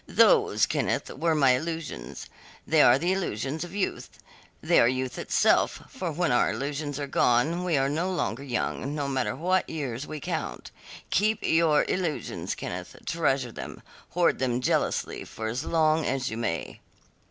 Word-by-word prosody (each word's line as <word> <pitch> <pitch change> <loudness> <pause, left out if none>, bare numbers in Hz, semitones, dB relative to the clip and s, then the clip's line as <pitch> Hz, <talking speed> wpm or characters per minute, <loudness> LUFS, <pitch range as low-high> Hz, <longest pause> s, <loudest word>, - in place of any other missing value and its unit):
Those, - - +4
Kenneth, - - -1
were 160 +3 +1
my 135 -4 +5
illusions. 155 - -4 0.4
They - - +4
are 120 - +7
the 175 +6 0
illusions 150 - -2
of 175 +2 -9
youth; 205 - -2 0.5
they - - +3
are 115 - +6
youth 130 0 -2
itself, - - +2
for - - -4
when - - 0
our - - +3
illusions 145 +1 -3
are 145 - -2
gone 140 +6 +2
we 175 -4 +1
are 135 0 +2
no 165 +6 -1
longer 135 -8 -2
young 140 +1 -3
no 145 -2 -2
matter 135 -2 -1
what 185 +2 0
years 140 -4 -4
we 155 - -6
count. - - -4 0.4
Keep 215 +3 +2
your 160 -2 +3
illusions, 175 -5 -2
Kenneth; - - -6
treasure 135 -7 0
them, - - -8 0.3
hoard 175 -1 +3
them 125 -2 0
jealously 125 - 0
for 110 - -7
as 120 +7 -2
long 160 -1 +2
as 135 -4 -1
you 110 - -4
may." 85 -8 -3
145 Hz, 165 wpm, -27 LUFS, 130-165 Hz, 0.5 s, are